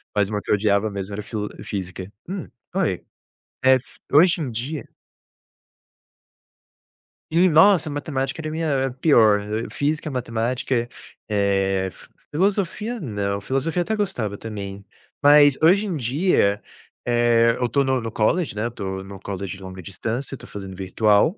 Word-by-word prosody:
Mas 100 -2 +2
uma 105 -1 -2
que - - -14
eu - - +6
odiava 105 +1 +2
mesmo 100 0 -5
era 105 - -4
filo 105 -1 -4
física. 95 -1 -5 0.2
Hum, 190 -1 -4 0.3
oi? 165 - 0 0.6
Eh, 130 0 +7
f 130 - -9
hoje 170 +4 +5
em 140 -5 -2
dia 130 +7 -4 2.5
Ih, 175 +3 +5
nossa, 170 +1 +5
matemática 145 -1 -3
era 155 - -4
minha 150 -4 0
pior. 110 -9 +5 0.3
Física, 150 +2 -1
matemática. 120 -1 -1 0.4
Eh, 95 -2 +1
f - - -17 0.3
filosofia 200 +6 0
não. 100 -6 -2
Filosofia 135 - -1
até 220 +5 -1
gostava 120 - -2
também. 100 -3 -7 0.4
Mas, 145 -1 +7
hoje 185 +6 +5
em 180 -5 -2
dia, 125 - +2 0.4
eh, 120 -1 +4
eu 125 - 0
estou 140 +4 +2
no 130 -1 +1
no 115 -1 -4
college, 155 - +1
né, 105 - -2
eu - - -1
estou 95 -5 -5
no 95 0 -10
college 100 0 -5
longa 95 0 -8
distância, 115 +9 -4
estou - - -12
fazendo 95 -2 -7
virtual. 105 - +2
120 Hz, 145 wpm, -23 LUFS, 100-155 Hz, 2.5 s, Eh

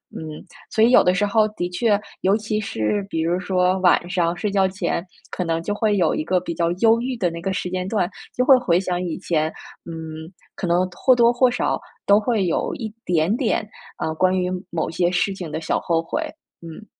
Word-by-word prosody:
嗯。 155 +2 -8 0.2
所 220 - +2
以 235 - +5
有 - - +7
的 180 - +3
时 205 +2 +2
候 215 +1 +3
的 175 -4 -3
确， 205 +3 +1 0.2
尤 195 +2 +3
其 215 0 -2
是 200 - -1
比 160 - -2
如 170 +3 0
说 185 0 +1
晚 180 -1 +3
上 175 -2 0
睡 205 +2 -2
觉 195 -1 +3
前 185 -2 -2 0.3
可 180 - -2
能 165 -1 -1
就 205 - -2
会 210 -1 +1
有 180 - +2
一 - - -1
个 180 +2 +1
比 170 -1 -4
较 170 0 0
忧 225 +4 +3
郁 255 0 -2
的 180 -6 +1
那 170 - -7
个 190 +2 -2
时 180 - -3
间 185 0 -2
段， 195 -4 0 0.3
就 250 - +1
会 270 - +8
回 180 -8 +2
想 180 -1 -2
以 170 -3 -3
前， 160 -4 0 0.4
嗯， 160 0 -7 0.3
可 180 - -3
能 180 +2 +2
或 255 +8 +3
多 235 0 +4
或 250 +1 +4
少 245 - -1 0.3
都 200 +1 +5
会 215 -3 0
有 170 - -1
一 220 -3 -6
点 175 +3 +2
点， 230 -4 0 0.3
啊， 160 - -2
关 185 +3 +2
于 180 0 -1 0.2
某 165 -2 -2
些 175 +1 +1
事 195 +2 0
情 175 -5 -7
的 160 - -3
小 160 - 0
后 165 -1 0
悔， 165 - -3 0.4
嗯。 165 +5 -10
185 Hz, 240 characters per minute, -22 LUFS, 170-210 Hz, 0.4 s, 会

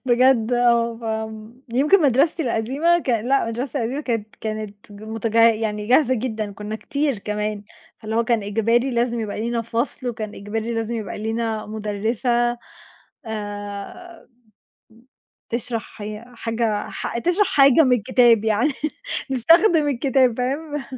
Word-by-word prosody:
بجد 250 -2 +3
آه، 230 -2 +1 0.4
فيمكن 295 +10 +4
مدرستي 285 +4 +3
القديمة 275 +8 +1
ك 320 - -8
لأ، 245 +4 +2
المدرسة 245 +5 -3
القديمة 245 +5 -2
كانت 225 -6 -3
كانت 215 -2 -4 0.2
متج 220 +2 -5
يعني 220 -2 +3
جاهزة 260 +1 +4
جدًا، 220 -4 -3
كنا 210 +2 -6
كتير 285 -1 -2
كمان، 210 0 -3 0.4
فاللي 220 0 -4
هو 230 - +2
كان 235 -3 +1
إجباري 230 +5 +1
لازم 235 -1 0
يبقى 210 -1 -4
لينا 235 +1 -1
فصل، 235 +3 -3
وكان 220 -3 -5
إجباري 220 +3 -4
لازم 225 +1 -2
يبقى 215 -5 -5
لينا 220 0 -2
مُدرّسة 225 +3 -1 0.7
آآ، 205 - -7 1.2
بتشرح 230 -2 -4
هي 210 +2 -6
حاجة 225 -2 -1
ح - - -4
تشرح 355 - +2
حاجة 275 +2 +6
من 255 -2 +4
الكتاب 235 -1 +4
يعني، 225 +7 +2 0.6
نستخدم 325 - +4
الكتاب، 260 -2 +2
فاهم؟ 290 +3 -2
230 Hz, 130 wpm, -22 LUFS, 215-255 Hz, 1.2 s, حاجة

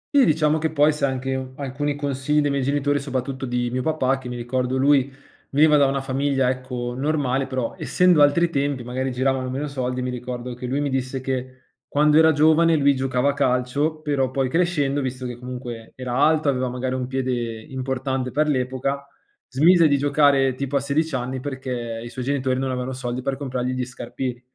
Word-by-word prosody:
Sì 275 -3 +7
diciamo 155 -1 +2
che 160 - 0
poi 150 0 +4
sai 140 -2 0
anche 130 0 -3
alcuni 140 +1 -3
consigli 145 +1 0
dei 145 - +1
miei 140 0 0
genitori, 145 +1 +1
soprattutto 135 -1 -4
di 120 0 -1
mio 130 0 -1
papà, 135 -3 0
che 125 -1 -8
mi 125 - -5
ricordo 125 +2 -1
lui 140 0 +3 0.4
veniva 150 +2 +5
da 140 -2 +5
una 135 0 -1
famiglia, 135 -1 +1
ecco, 125 -1 -4
normale, 135 -2 0
però 130 -3 -2
essendo 180 -4 +3
altri 165 +4 +4
tempi, 140 -3 -1
magari 130 +2 -3
giravano 130 0 0
meno 135 +3 -3
soldi, 125 -2 -3
mi 125 - -2
ricordo 125 0 -5
che 125 +1 -6
lui 140 +3 -1
mi 140 -2 -1
disse 130 0 -2
che 130 0 -4 0.3
quando 150 +1 +3
era 160 0 +6
giovane 160 +2 +4
lui 140 -2 +3
giocava 130 +1 +1
a - - -6
calcio, 140 +3 0
però 140 -4 0
poi 130 0 -1
crescendo, 145 -4 +1
visto 130 -1 -4
che 125 -1 -4
comunque 125 -2 -7
era 125 -1 -5
alto, 155 +2 +3
aveva 130 -2 +1
magari 125 +1 -3
un 130 -1 -2
piede 130 0 -2 0.3
importante 130 0 -3
per 150 +4 +1
l'epoca, 135 +1 -1 0.4
smise 165 +5 +5
di 145 -1 +3
giocare 140 -2 +3
tipo 140 +2 -4
a - - +4
sedici 150 +4 0
anni 130 +1 -3
perché 125 -4 -5
i 120 - -7
suoi 130 +1 -6
genitori 130 -1 0
non 135 0 -1
avevano 125 +1 -3
soldi 125 0 -4
per 135 - -1
comprargli 130 -2 -3
gli 130 0 -2
scarpini, 125 0 -5
135 Hz, 195 wpm, -23 LUFS, 125-145 Hz, 0.4 s, Sì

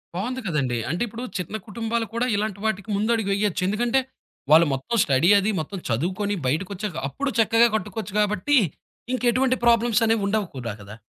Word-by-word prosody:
బావుంది 250 +8 -3
కదండీ! 140 -9 0
అంటే, 170 +4 -2
ఇప్పుడు 230 +3 -7 0.2
చిన్న 180 +4 -5
కుటుంబాలు 225 +2 -2
కూడా 235 +2 0
ఇలాంటి 205 -1 -2
వాటికి 220 -1 -2
ముందడుగు 220 0 0
వేయొచ్చు. 200 -2 0
ఎందుకంటే, 235 +6 +1 0.5
వాళ్ళు 160 +1 +7
మొత్తం 135 - -3
స్టడీ 140 +5 +3
అది 200 +2 0
మొత్తం 180 +5 -5
చదువుకొని 185 - -1
బయటకొచ్చాక, 185 +5 -2
అప్పుడు 280 - -3
చక్కగా 230 +1 +5
కట్టుకోవచ్చు 210 0 -4
కాబట్టి, 210 +7 +2 0.6
ఇంకెటువంటి 255 +1 +2
ప్రాబ్లమ్స్ 235 -1 +4
అనేవి 225 -2 +1
ఉండవుకూడా 170 - -2
కదా! 100 +1 -10
210 Hz, 150 wpm, -24 LUFS, 180-230 Hz, 0.6 s, వాళ్ళు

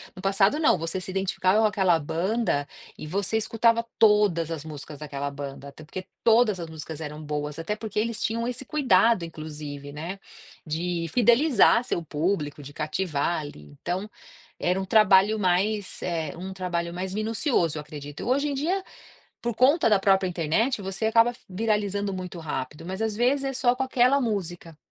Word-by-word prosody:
No 185 - -9
passado 195 +8 +3
não, 315 - +4
você 165 +3 -3
se 185 - -7
identificava 190 +1 +1
com 220 - +4
aquela 190 -5 +3
banda 170 -1 -1 0.3
e - - -7
você 195 +5 -1
escutava 230 +1 +2
todas 205 -7 +4
as 160 -2 -4
músicas 150 -1 -9
daquela 140 -1 -4
banda, 140 0 -7
até 155 - -13
porque 185 +5 -7 0.2
todas 225 -4 +4
as 165 - -6
músicas 160 0 -7
eram 150 0 -6
boas, 150 0 -4
até 165 +6 -3
porque 215 -1 -7
eles 230 0 -2
tinham 230 +1 -1
esse 250 +2 -4
cuidado 230 - +3
inclusive, 150 -3 -8
né, 170 +7 -6 0.5
de 165 +2 -2
fidelizar 240 0 +5
seu 175 - -2
público, 150 -1 -2
de 145 0 -10
cativar 155 +1 -1
ali. 145 - -9 0.2
Então, 185 +4 -3 0.5
era 180 +2 +1
um - - -4
trabalho 210 +1 +5
mais, 195 +2 0
eh, 165 -4 -3
um 190 +2 -6
trabalho 175 -2 -3
mais 185 +1 -4
minucioso, 215 - 0
eu - - -3
acredito. 145 -1 -8
Hoje 280 +3 +1
em - - -2
dia, 350 +8 -1 0.6
por 235 -2 -2
conta 265 +2 +4
da 210 - +5
própria 195 -1 +3
internet, 180 - 0
você 195 +3 -3
acaba 230 +2 +4 0.2
viralizando 205 0 -1
muito 185 -1 -6
rápido, 150 -1 -5
mas 190 +4 -5
às 220 -2 -1
vezes 260 +5 +2
é 270 - -2
só 245 -1 +3
com - - -4
aquela 260 +1 +3
música, 175 - -3
190 Hz, 175 wpm, -26 LUFS, 160-225 Hz, 0.6 s, fidelizar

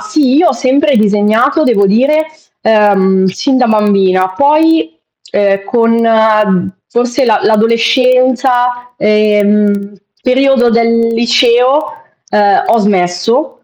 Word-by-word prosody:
sì, 305 -5 -1
io 340 +3 +3
ho - - 0
sempre 270 +3 0
disegnato, 215 +8 +1
devo 210 -6 +1
dire, 275 +10 +1 0.3
ehm, 195 -3 +1
sin 260 +9 -2
da 255 -1 +1
bambina, 195 -4 +1
poi, 295 - 0 0.3
ehm, 195 -1 -1
con 220 -5 0 0.2
forse 245 +3 -2
la 225 -3 +1
l'adolescenza, 245 +2 0
ehm, 210 -1 0 0.3
periodo 260 -1 +1
del 230 0 0
liceo, 245 +4 +1 0.4
ehm, 205 -1 +1
ho 230 - +1
smesso. 200 - -1
230 Hz, 105 wpm, -11 LUFS, 205-255 Hz, 0.4 s, io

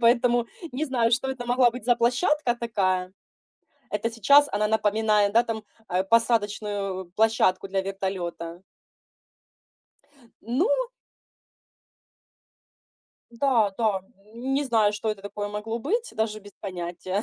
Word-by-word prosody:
поэтому 240 0 +3 0.3
не 275 +5 -1
знаю, 245 -5 +1
что 255 +3 +1
это 250 -2 -6
могла 245 0 +4
быть 240 -2 -9
за 245 0 +3
площадка 250 +2 +2
такая. 185 -6 -1 0.8
Это 210 +2 -1
сейчас 280 +6 +5
она 210 +1 +1
напоминает, 215 -1 +2
да, 230 +2 +5
там, 225 -2 -4 0.3
э, 185 +1 0
посадочную 205 -4 0
площадку 215 -4 +2
для 195 0 0
вертолета. 185 -3 -4 1.8
Ну 255 - +1 2.6
Да, 235 -4 +2
да, 215 -4 +1 0.3
м, 255 +3 -2
не 285 +1 +1
знаю, 220 -5 +3
что 210 +1 -3
это 210 -2 -3
такое 205 0 -5
могло 210 +2 -4
быть, 450 - -2
даже 215 -1 -1
без 205 0 -14
понятия. 185 +1 -4
220 Hz, 120 wpm, -25 LUFS, 200-240 Hz, 2.6 s, сейчас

